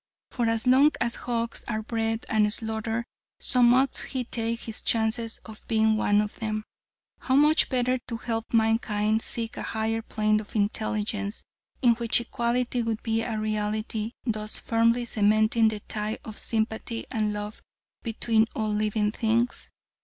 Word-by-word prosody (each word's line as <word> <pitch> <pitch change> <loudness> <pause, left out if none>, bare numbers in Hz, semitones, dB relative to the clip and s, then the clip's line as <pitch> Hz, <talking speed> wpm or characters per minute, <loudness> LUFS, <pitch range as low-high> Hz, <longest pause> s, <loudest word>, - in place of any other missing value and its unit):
For 240 -3 0
as 225 +1 +1
long 265 +4 +6
as 235 - +1
hogs 235 -1 -3
are 220 -1 -2
bred 225 0 -2
and 210 -1 +2
slaughtered, 225 +1 -1 0.3
so 250 - +3
must 250 +3 +4
he 260 -2 -3
take 230 -1 -3
his 225 -1 -5
chances 225 0 0
of 220 -1 -11
being 220 -1 +3
one 205 -1 +3
of 210 0 -5
them. 215 -1 -2 0.6
How 260 - 0
much 300 +3 +5
better 255 -1 +1
to 230 - -4
help 225 -1 -4
mankind 220 -1 +2
seek 230 0 -2
a - - -3
higher 220 0 -1
plane 215 -1 +1
of 210 +1 -10
intelligence, 210 0 -1 0.4
in 240 -2 +6
which 235 0 +2
equality 240 +1 -1
would 225 -1 -2
be 225 0 0
a 225 -1 -2
reality, 215 +1 -2
thus 215 -2 -2
firmly 230 +1 +2
cementing 215 +1 +3
the 215 -1 -2
tie 210 +1 -3
of 215 -2 -8
sympathy 225 +1 -2
and 215 -4 0
love 210 +1 -5 0.4
between 225 -1 +1
all 215 -1 -1
living 210 0 +1
things. 230 +2 0
225 Hz, 155 wpm, -27 LUFS, 215-235 Hz, 0.6 s, long